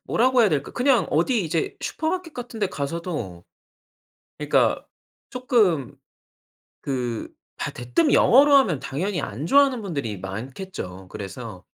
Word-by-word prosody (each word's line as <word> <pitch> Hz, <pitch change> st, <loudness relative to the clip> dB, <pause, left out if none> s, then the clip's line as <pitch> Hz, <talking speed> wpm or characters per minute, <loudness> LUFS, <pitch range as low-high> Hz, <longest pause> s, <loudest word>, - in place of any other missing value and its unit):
뭐라고 255 Hz, +2 st, +3 dB
해야 220 Hz, -, +5 dB
될까. 145 Hz, -6 st, -2 dB
그냥 245 Hz, -3 st, +2 dB
어디 195 Hz, -, +1 dB
이제 165 Hz, 0 st, -2 dB
슈퍼마켓 330 Hz, +1 st, -3 dB
같은 245 Hz, -2 st, -7 dB
데 205 Hz, -, +2 dB
가서도 140 Hz, -, -5 dB, 0.9 s
그러니까 -, -, +2 dB, 0.5 s
쪼끔 215 Hz, -, +1 dB, 0.9 s
그 125 Hz, -4 st, -3 dB, 0.3 s
다 -, -, -3 dB
대뜸 120 Hz, +7 st, +1 dB
영어로 280 Hz, +3 st, +6 dB
하면 185 Hz, -, +4 dB
당연히 170 Hz, +8 st, -3 dB
안 130 Hz, +10 st, -4 dB
좋아하는 275 Hz, -2 st, +4 dB
분들이 140 Hz, -, -4 dB
많겠죠. 95 Hz, -, -7 dB
그래서 100 Hz, 0 st, -8 dB
165 Hz, 280 characters per minute, -24 LUFS, -, 0.9 s, 영어로